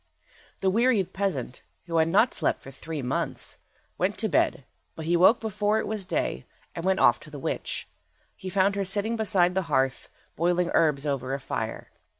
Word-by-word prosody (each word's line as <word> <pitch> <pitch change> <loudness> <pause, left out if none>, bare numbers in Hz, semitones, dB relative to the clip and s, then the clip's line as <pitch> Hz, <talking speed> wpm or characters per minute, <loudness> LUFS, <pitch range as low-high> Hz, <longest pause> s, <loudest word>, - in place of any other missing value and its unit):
The 190 - +2
wearied 225 -3 +2
peasant, 170 -11 -2 0.2
who 165 -2 -1
had 160 0 +4
not 210 +8 +3
slept - - 0
for 135 - -10
three 150 +1 -6
months, 125 - -3 0.4
went - - 0
to - - 0
bed, - - +1 0.3
but 160 - -6
he 170 +2 +2
woke 185 +7 +6
before 210 -1 0
it - - -1
was 210 -3 -4
day, 65 - -2 0.3
and 165 - -6
went 190 +1 +2
off - - +5
to 155 - -12
the 150 - -8
witch. 135 - -3 0.5
He 190 - -7
found 195 +1 +2
her 200 - 0
sitting 205 +4 -1
beside 190 -5 +2
the 190 - +1
hearth 135 -2 0 0.3
boiling 175 +1 +1
herbs 150 -3 +3
over 135 -2 -1
a - - -5
fire. - - -5
180 Hz, 185 wpm, -26 LUFS, 150-200 Hz, 0.5 s, woke